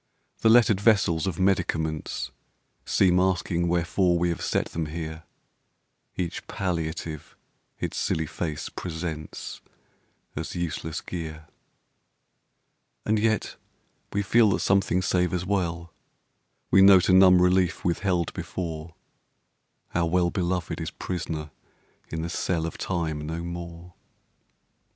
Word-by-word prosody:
The 110 Hz, -, +4 dB
lettered 110 Hz, -4 st, +5 dB
vessels 100 Hz, -6 st, +3 dB
of 90 Hz, -4 st, -2 dB
medicaments 80 Hz, -5 st, 0 dB, 0.6 s
Seem 90 Hz, -1 st, +4 dB
asking 90 Hz, -2 st, +1 dB
wherefore 85 Hz, +1 st, +2 dB
we 85 Hz, +1 st, +1 dB
have 85 Hz, -, -3 dB
set -, -, 0 dB
them 80 Hz, -1 st, -3 dB
here; 80 Hz, 0 st, -6 dB, 0.9 s
Each 85 Hz, -2 st, -4 dB
palliative 80 Hz, -4 st, -4 dB, 0.4 s
its -, -, -3 dB
silly 80 Hz, -, 0 dB
face 75 Hz, -1 st, -4 dB
presents 80 Hz, -3 st, -6 dB, 0.7 s
As 80 Hz, +4 st, -5 dB
useless 80 Hz, -2 st, -3 dB
gear. 80 Hz, -3 st, -6 dB, 1.6 s
And 110 Hz, 0 st, +2 dB
yet 110 Hz, 0 st, 0 dB, 0.5 s
we 100 Hz, -, 0 dB
feel 110 Hz, +2 st, +5 dB
that 95 Hz, -, +1 dB
something 95 Hz, -2 st, +2 dB
savours 90 Hz, -1 st, +1 dB
well; 85 Hz, -4 st, -2 dB, 0.8 s
We 95 Hz, -, +7 dB
note 95 Hz, -2 st, +7 dB
a 95 Hz, -, +4 dB
numb 95 Hz, -1 st, +7 dB
relief 90 Hz, 0 st, +2 dB
withheld 90 Hz, -1 st, 0 dB
before; 85 Hz, -2 st, -5 dB, 1.0 s
Our 85 Hz, -1 st, +1 dB
well 90 Hz, 0 st, +2 dB
beloved 90 Hz, -1 st, -2 dB
is -, -, -3 dB
prisoner 80 Hz, -4 st, -5 dB, 0.6 s
in 80 Hz, 0 st, -3 dB
the 85 Hz, -, -3 dB
cell 85 Hz, -2 st, -1 dB
Of 85 Hz, -, -6 dB
Time 80 Hz, -4 st, -2 dB
no 80 Hz, +1 st, -4 dB
more. 85 Hz, 0 st, -7 dB
85 Hz, 120 wpm, -26 LUFS, 80-95 Hz, 1.6 s, We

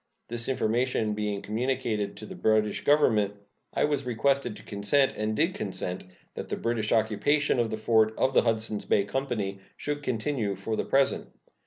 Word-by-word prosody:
This 120 Hz, +1 st, 0 dB
information 120 Hz, -2 st, 0 dB
being 105 Hz, -1 st, -2 dB
communicated 110 Hz, -2 st, -1 dB
to 105 Hz, -, -8 dB
the -, -, -8 dB
British 110 Hz, -1 st, +1 dB
Government, 110 Hz, -9 st, +3 dB, 0.4 s
I -, -, 0 dB
was 145 Hz, -2 st, +1 dB
requested 125 Hz, 0 st, 0 dB
to -, -, -13 dB
consent, 120 Hz, +7 st, +1 dB
and 110 Hz, +1 st, -1 dB
did 165 Hz, +8 st, +2 dB
consent, 95 Hz, -, -3 dB, 0.3 s
that -, -, -7 dB
the -, -, -2 dB
British 115 Hz, -2 st, -1 dB
occupation 120 Hz, +6 st, +2 dB
of 115 Hz, -1 st, +1 dB
the 110 Hz, -, -3 dB
fort 110 Hz, 0 st, +2 dB
of 130 Hz, -, +2 dB
the -, -, +6 dB
Hudsons 110 Hz, -2 st, 0 dB
Bay 100 Hz, -, +3 dB
Company 105 Hz, -4 st, -3 dB, 0.2 s
should 145 Hz, 0 st, -3 dB
continue 115 Hz, -4 st, -1 dB
for 105 Hz, +4 st, -3 dB
the -, -, -2 dB
present. 135 Hz, 0 st, +2 dB
110 Hz, 170 wpm, -28 LUFS, 105-130 Hz, 0.4 s, the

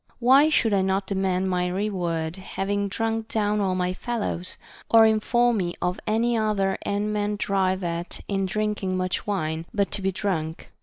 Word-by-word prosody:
Why 265 Hz, +5 st, +5 dB
should 225 Hz, -8 st, +2 dB
I 195 Hz, -, +3 dB
not 190 Hz, +1 st, 0 dB
demand 190 Hz, -1 st, 0 dB
my 180 Hz, 0 st, +1 dB
reward, 180 Hz, -4 st, -2 dB
having 200 Hz, +1 st, -2 dB
drunk 225 Hz, +2 st, -2 dB
down 210 Hz, -1 st, 0 dB
all 190 Hz, -2 st, +1 dB
my 180 Hz, 0 st, 0 dB
fellows? 205 Hz, -5 st, -3 dB, 0.2 s
— -, -, -21 dB
or 225 Hz, -1 st, +7 dB
inform 235 Hz, +2 st, +3 dB
me 175 Hz, -3 st, -2 dB
of 180 Hz, +1 st, -1 dB
any 230 Hz, +2 st, +2 dB
other 210 Hz, -3 st, +1 dB
end 205 Hz, +1 st, -1 dB
men 210 Hz, 0 st, 0 dB
drive 190 Hz, -2 st, 0 dB
at 170 Hz, 0 st, -3 dB
in 195 Hz, -1 st, 0 dB
drinking 210 Hz, -2 st, -1 dB
much 185 Hz, +2 st, -2 dB
wine, 165 Hz, -5 st, -2 dB
but 200 Hz, -1 st, +1 dB
to 200 Hz, -, -1 dB
be 195 Hz, 0 st, +1 dB
drunk. 170 Hz, -5 st, -3 dB
195 Hz, 175 wpm, -25 LUFS, 185-215 Hz, 0.2 s, or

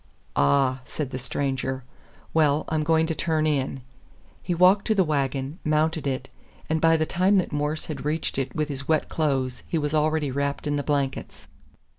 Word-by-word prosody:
"Ah," 130 Hz, -, +3 dB
said 140 Hz, 0 st, -5 dB
the 130 Hz, -, -4 dB
stranger. 130 Hz, +1 st, -2 dB, 0.5 s
"Well, 155 Hz, -1 st, +3 dB
I'm 155 Hz, -1 st, 0 dB
going 160 Hz, +1 st, +3 dB
to 160 Hz, -, -1 dB
turn 155 Hz, -1 st, 0 dB
in." 135 Hz, -3 st, -1 dB, 0.6 s
He 175 Hz, -, -2 dB
walked 185 Hz, +3 st, +5 dB
to 220 Hz, -, +3 dB
the 190 Hz, -, +4 dB
wagon, 140 Hz, 0 st, -1 dB
mounted 155 Hz, 0 st, +1 dB
it, 130 Hz, 0 st, -2 dB, 0.4 s
and 160 Hz, 0 st, 0 dB
by 165 Hz, 0 st, +5 dB
the 155 Hz, -, +1 dB
time 185 Hz, +5 st, +2 dB
that 185 Hz, -, 0 dB
Morse 150 Hz, +1 st, -1 dB
had 150 Hz, -5 st, -6 dB
reached 150 Hz, -1 st, -1 dB
it 130 Hz, -2 st, -3 dB
with 155 Hz, -1 st, 0 dB
his 140 Hz, -1 st, -5 dB
wet 160 Hz, -1 st, +1 dB
clothes 135 Hz, -5 st, -1 dB
he 165 Hz, -, -1 dB
was 150 Hz, -1 st, -1 dB
already 155 Hz, -2 st, +1 dB
wrapped 140 Hz, +2 st, -2 dB
in 145 Hz, 0 st, 0 dB
the 145 Hz, -, 0 dB
blankets. 140 Hz, -, -2 dB
150 Hz, 185 wpm, -25 LUFS, 135-160 Hz, 0.6 s, walked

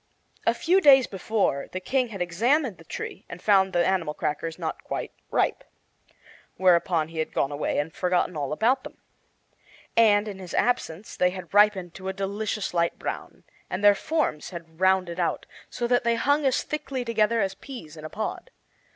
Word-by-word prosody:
A -, -, +4 dB
few 370 Hz, +3 st, +3 dB
days 270 Hz, -5 st, +7 dB
before 195 Hz, -7 st, -1 dB
the 185 Hz, -, -3 dB
King 255 Hz, +6 st, 0 dB
had 195 Hz, -5 st, -3 dB
examined 230 Hz, -, +1 dB
the -, -, -13 dB
tree -, -, -6 dB
and 170 Hz, -, -8 dB
found 195 Hz, -1 st, +4 dB
the 175 Hz, -2 st, +2 dB
animal 170 Hz, -6 st, 0 dB
crackers 160 Hz, +2 st, -3 dB
not 165 Hz, -3 st, -4 dB
quite -, -, -4 dB, 0.2 s
ripe. -, -, 0 dB, 0.9 s
Whereupon 170 Hz, -3 st, +3 dB
he 165 Hz, -1 st, -6 dB
had 155 Hz, -, -2 dB
gone 135 Hz, -, +1 dB
away 145 Hz, +1 st, -2 dB
and 150 Hz, +2 st, -1 dB
forgotten 180 Hz, -1 st, 0 dB
all 145 Hz, -3 st, -3 dB
about 240 Hz, -, +2 dB
them. -, -, -10 dB, 1.0 s
And, 215 Hz, -2 st, +5 dB
in 200 Hz, -2 st, -6 dB
his 185 Hz, -2 st, -7 dB
absence, 215 Hz, -6 st, -1 dB
they 180 Hz, -, +3 dB
had 180 Hz, -2 st, -9 dB
ripened 200 Hz, -4 st, +4 dB
to 190 Hz, 0 st, -8 dB
a 190 Hz, -, -1 dB
delicious 200 Hz, +1 st, -3 dB
light 170 Hz, -1 st, +1 dB
brown; -, -, -6 dB, 0.3 s
and 185 Hz, +2 st, -3 dB
their 205 Hz, 0 st, +8 dB
forms 250 Hz, -, -1 dB
had 165 Hz, -2 st, -10 dB
rounded 185 Hz, -2 st, +2 dB
out, 170 Hz, -, -1 dB, 0.2 s
so 240 Hz, -, -3 dB
that 245 Hz, 0 st, +2 dB
they 235 Hz, -1 st, +2 dB
hung 285 Hz, +4 st, +2 dB
as 260 Hz, -, +1 dB
thickly 270 Hz, -4 st, -4 dB
together 230 Hz, 0 st, +2 dB
as 195 Hz, -2 st, 0 dB
peas 195 Hz, -, -10 dB
in 155 Hz, -, -11 dB
a 155 Hz, -, -6 dB
pod. 220 Hz, -, -4 dB
190 Hz, 185 wpm, -26 LUFS, 170-230 Hz, 1.0 s, their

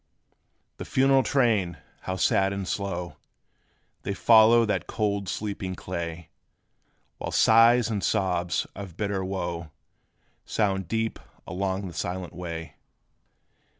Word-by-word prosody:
The -, -, -6 dB
funeral 135 Hz, 0 st, +4 dB
train, 110 Hz, -, +1 dB, 0.2 s
how 95 Hz, -, -3 dB
sad 95 Hz, +1 st, +2 dB
and 100 Hz, -2 st, -4 dB
slow 90 Hz, -6 st, -3 dB, 0.8 s
They 100 Hz, -, -3 dB
follow 115 Hz, +1 st, +6 dB
that 105 Hz, -, -1 dB
cold 100 Hz, -3 st, -1 dB
sleeping 100 Hz, -3 st, -4 dB
clay; 85 Hz, -2 st, -6 dB, 0.9 s
While -, -, -4 dB
sighs 115 Hz, +2 st, +5 dB
and 100 Hz, -3 st, -2 dB
sobs 90 Hz, -2 st, 0 dB
of 95 Hz, -4 st, -8 dB
bitter 100 Hz, -2 st, -1 dB
wo 85 Hz, -4 st, -4 dB, 0.7 s
Sound 95 Hz, -4 st, -1 dB
deep 110 Hz, +3 st, -2 dB, 0.3 s
along 95 Hz, +1 st, -2 dB
the 90 Hz, -, -7 dB
silent 90 Hz, +2 st, -4 dB
way. 85 Hz, -2 st, -7 dB
95 Hz, 115 wpm, -26 LUFS, 90-110 Hz, 0.9 s, follow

